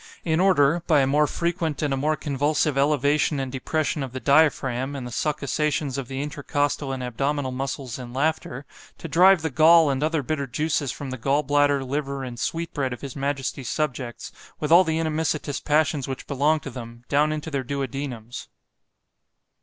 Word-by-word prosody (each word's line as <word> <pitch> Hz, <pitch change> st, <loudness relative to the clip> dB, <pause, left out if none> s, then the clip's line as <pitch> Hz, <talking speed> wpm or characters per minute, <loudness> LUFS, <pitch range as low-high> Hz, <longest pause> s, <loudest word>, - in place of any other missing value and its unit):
in 160 Hz, -1 st, +1 dB
order, 170 Hz, -4 st, +4 dB
by 150 Hz, -3 st, +5 dB
a -, -, +3 dB
more 145 Hz, +3 st, +3 dB
frequent 170 Hz, -3 st, -2 dB
and 145 Hz, -2 st, +1 dB
a -, -, +1 dB
more 150 Hz, +3 st, +1 dB
convulsive 145 Hz, +1 st, 0 dB
elevation 145 Hz, +1 st, +2 dB
and 135 Hz, -1 st, -3 dB
depression 150 Hz, +3 st, -1 dB
of 130 Hz, -2 st, -5 dB
the 130 Hz, -, -4 dB
diaphragm, 140 Hz, -2 st, +2 dB
and 130 Hz, -3 st, -5 dB
the 120 Hz, -, -7 dB
succussations 150 Hz, +1 st, -1 dB
of 135 Hz, -3 st, -4 dB
the 135 Hz, +2 st, -3 dB
intercostal 145 Hz, -1 st, -2 dB
and 130 Hz, -1 st, -4 dB
abdominal 135 Hz, +3 st, -1 dB
muscles 130 Hz, -1 st, -4 dB
in 120 Hz, -1 st, -8 dB
laughter, 140 Hz, -1 st, -2 dB, 0.3 s
to -, -, -7 dB
drive 180 Hz, +2 st, +5 dB
the 160 Hz, -, -1 dB
gall 160 Hz, +2 st, +6 dB
and 135 Hz, 0 st, -2 dB
other 155 Hz, -1 st, 0 dB
bitter 140 Hz, 0 st, -2 dB
juices 145 Hz, 0 st, -1 dB
from 135 Hz, 0 st, -7 dB
the 130 Hz, -, -6 dB
gall 140 Hz, +5 st, +1 dB
bladder, 145 Hz, -1 st, +2 dB
liver, 140 Hz, 0 st, -3 dB
and 120 Hz, -2 st, -7 dB
sweet 165 Hz, +5 st, -3 dB
bread 135 Hz, -4 st, -1 dB
of 125 Hz, -, -9 dB
his 140 Hz, -3 st, -7 dB
majesty's 135 Hz, -2 st, -3 dB
subjects, 130 Hz, -6 st, -3 dB, 0.3 s
with 150 Hz, 0 st, -2 dB
all 175 Hz, +3 st, +8 dB
the 160 Hz, -2 st, -1 dB
inimicitious 155 Hz, -2 st, -1 dB
passions 150 Hz, -2 st, +1 dB
which 135 Hz, -1 st, -5 dB
belong 145 Hz, +3 st, +1 dB
to 140 Hz, -, -8 dB
them, 120 Hz, -1 st, -9 dB
down 150 Hz, +2 st, +2 dB
into 155 Hz, +1 st, -4 dB
their 140 Hz, -2 st, -1 dB
duodenums. 130 Hz, -3 st, -5 dB
145 Hz, 185 wpm, -24 LUFS, 135-155 Hz, 0.3 s, all